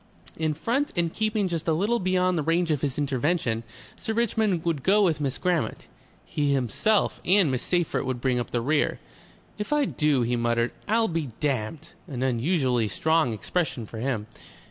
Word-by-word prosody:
In 155 -1 -1
front 250 - 0
and 170 -2 0
keeping 215 -2 0
just 170 -2 -3
a 160 - +3
little 210 +9 +1
beyond 185 -1 +2
the 160 - +1
range 165 +2 +1
of 145 -3 0
his 140 -3 -2
intervention, 140 -3 0 0.3
Sir 220 - -4
Richmond 220 -6 +1
would 165 -5 0
go 205 +8 +4
with 160 -5 +1
Miss 135 -2 -1
Grammont; 180 -3 -1 0.4
he 145 -1 0
himself 140 - +1
and 185 -5 +4
Miss 130 -1 -1
Seyffert 175 -3 0
would 130 -2 -2
bring 125 -1 +1
up 120 - -3
the 120 - -1
rear. 145 +5 +1 0.6
"If 210 - -4
I 295 -1 +3
do," 150 - +1
he 120 +1 0
muttered, 115 0 +1 0.2
"I'll 225 +2 +3
be 165 -6 -2
damned!" 140 +2 -2 0.2
an 130 -5 -4
unusually 130 -2 +1
strong 160 +5 +2
expression 120 - -2
for 110 +1 -8
him. 115 -4 -1
155 Hz, 180 wpm, -26 LUFS, 130-180 Hz, 0.6 s, go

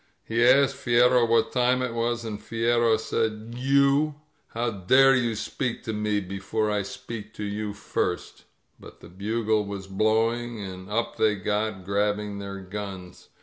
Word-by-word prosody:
He 115 +1 0
asked 135 +2 +5
Fierro 120 0 +4
what 115 -1 +3
time 125 0 +2
it 125 -2 -2
was, 120 0 -1
and 105 -2 -5
Fierro 115 0 +2
said. 110 0 -2
You! 140 +3 +3 0.3
How 115 +1 -2
dare 130 +8 +5
you 120 -3 0
speak 115 +3 -3
to 110 - -3
me 105 -1 0
before 100 +3 -2
I 105 -1 +1
speak 115 -1 -8
to 105 - -5
you 105 0 -3
first 100 - -3
^" - - -22 0.4
But - - -14
the - - -12
bugle 110 +3 0
was 100 -1 -6
blowing, 110 +4 0
and 95 -1 -8
up 115 +2 -2
they 110 -1 +3
got, 105 -1 -2
grab 105 +1 +1
bing 105 -1 -5
their 100 0 -6
guns. 95 -2 -8
110 Hz, 165 wpm, -26 LUFS, 105-120 Hz, 0.4 s, asked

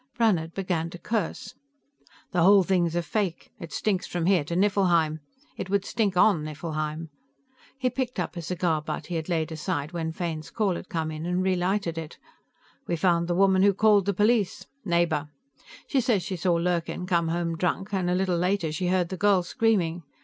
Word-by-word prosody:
Brannhard 180 -9 +1
began 175 -4 -1
to 175 - -9
curse. 205 0 -3 0.8
"The 175 - +1
whole 195 +2 +7
thing's 175 -3 +1
a 175 - 0
fake; 190 -2 -2
it 165 - -8
stinks 195 -4 -1
from 175 -2 -2
here 185 -4 +3
to 170 - -4
Nifflheim. 175 -5 +2 0.4
It 185 - -5
would 200 0 +1
stink 205 -5 0
on 180 -5 +4
Nifflheim." 155 +1 -4 0.7
He 255 -2 0
picked 255 -5 -3
up 180 - -3
a 170 - -4
cigar 165 -2 -1
butt 155 0 -5
he 175 - -5
had 160 +2 -5
laid 165 -2 0
aside 150 -1 -3
when 165 -2 -3
Fane's 160 -3 -4
call 210 -1 0
had 180 - -8
come 160 -1 -2
in 155 +2 -5
and 180 +1 0
relighted 185 -2 0
it. 160 -2 -8 0.7
"We 175 - 0
found 170 0 +2
the 175 - 0
woman 190 0 +4
who 200 0 +4
called 205 -2 +4
the 200 - +2
police. 210 -1 +1 0.2
Neighbor; 170 -5 +1 0.6
she 270 - +1
says 225 -7 +1
she 190 - -4
saw 175 0 +1
Lurkin 175 +1 -1
come 170 -2 +1
home 165 0 -1
drunk, 185 +4 -2
and 185 -2 0
a 180 - +2
little 185 -2 +1
later 180 -2 0
she 170 +4 -2
heard 180 -1 +1
the 185 - -5
girl 200 -2 +3
screaming. 175 -4 +1
175 Hz, 195 wpm, -26 LUFS, 165-195 Hz, 0.8 s, whole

